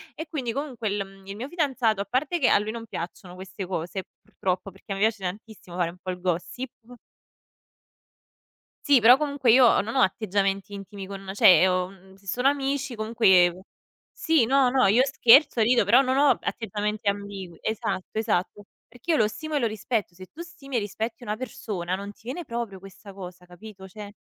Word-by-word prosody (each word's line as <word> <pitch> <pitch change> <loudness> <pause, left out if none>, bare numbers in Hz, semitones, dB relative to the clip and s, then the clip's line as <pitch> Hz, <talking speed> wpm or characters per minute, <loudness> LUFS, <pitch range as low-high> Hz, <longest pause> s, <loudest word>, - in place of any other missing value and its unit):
e 320 0 -7
quindi 255 -7 -3
comunque 255 -6 -4
l 200 0 -2
mhmm, 195 0 -17
il 200 - -6
mio 245 +5 -6
fidanzato 260 - 0
a - - -3
parte 280 - -1
che 255 - +3
a - - +5
lui 210 +1 -3
non 230 0 -7
piacciono 180 0 -7
queste 190 +1 -7
cose 180 +1 -4 0.2
purtroppo 185 +1 -3
perché 195 +2 -13
a - - -4
me 195 - -5
piace 215 -3 +1
tantissimo 195 -1 -7
fare 170 -2 +1
un 180 - -17
po' 185 - -4
il 180 0 -8
gossip. 185 +8 -3 2.2
Sì, 270 -5 +6
però 245 +4 +8
comunque 285 -5 +1
io 255 +1 +7
ho - - +4
non 225 +5 -6
ho - - +2
atteggiamenti 195 0 0
intimi 195 -1 -8
con 195 -1 -8
cioè, 190 -2 +6
ho, 185 0 0
mhmm 190 0 -18
se 195 - -24
sono 245 +8 0
amici 275 -2 -1
comunque 190 -5 +3 0.5
sì, 320 -8 +2
no, 265 0 +3
no. 260 -2 +3
Io 225 +6 +4
scherzo 270 0 +5
rido 235 +2 +4
però 230 +6 +5
non 260 -1 +1
ho 285 +1 +4
atteggiamenti 210 -1 -2
ambigui 200 -4 -6
esatto, 220 -4 -3
esatto. 205 -2 -1 0.2
Perché 245 +8 -5
io 315 - +3
lo 215 - +3
stimo 310 +7 -6
e - - +2
lo 235 - +1
rispetto. 215 -4 -3
Se 185 0 -12
tu 310 - -18
stimi 305 -7 -6
e - - +3
rispetti 220 +3 -5
una 210 -2 -3
persona 210 -8 -4
non 200 +1 -7
ti - - -26
viene 285 +8 -6
proprio 230 -6 -5
questa 195 +1 -13
cosa 180 -2 -10
capito, 190 +2 -12
cioè 205 +1 -9
215 Hz, 200 wpm, -25 LUFS, 190-250 Hz, 2.2 s, però